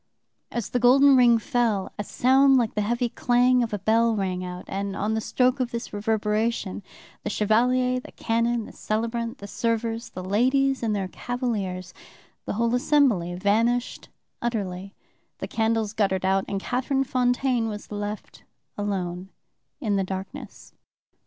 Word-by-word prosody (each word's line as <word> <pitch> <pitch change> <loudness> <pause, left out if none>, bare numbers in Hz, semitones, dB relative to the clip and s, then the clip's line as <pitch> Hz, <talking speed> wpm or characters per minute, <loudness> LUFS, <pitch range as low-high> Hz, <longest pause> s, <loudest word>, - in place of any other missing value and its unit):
As 235 -3 -3
the 245 - +1
golden 270 +3 +6
ring 240 -2 +6
fell, 225 -3 0
a - - -1
sound 265 +5 +4
like 235 -3 +1
the 210 - 0
heavy 240 +4 0
clang 245 +1 +3
of 235 - -1
a 210 - -1
bell 225 +3 +2
rang 185 -3 -2
out, 180 0 -7
and 195 0 -3
on 210 +3 -1
the 220 - -1
stroke 255 +4 +1
of 250 -2 0
this 235 -1 -6
reverberation 210 0 -1 0.4
the - - -3
Chevalier, 250 +5 +2
the - - -12
canon, 230 0 0
the - - -11
celebrant, 230 +2 -3
the 200 - -9
servers, 230 +2 -2
the 185 - -7
ladies 260 +7 +2
and 220 -3 0
their 195 -2 -2
cavaliers, 195 -6 -3 0.5
the - - -3
whole 230 +2 0
assembly 245 - +2
vanished 225 +6 0 0.3
utterly; 195 -5 -3 0.4
the - - -5
candles 225 -1 0
guttered 190 -3 0
out, 190 0 +2
and 195 - -2
Catherine 265 +3 0
Fontaine 245 -2 +1
was 210 0 -8
left 205 0 -6 0.4
alone 185 -2 -3 0.5
in 215 -8 0
the 195 - +1
darkness." 190 0 -7
225 Hz, 150 wpm, -25 LUFS, 200-245 Hz, 0.5 s, golden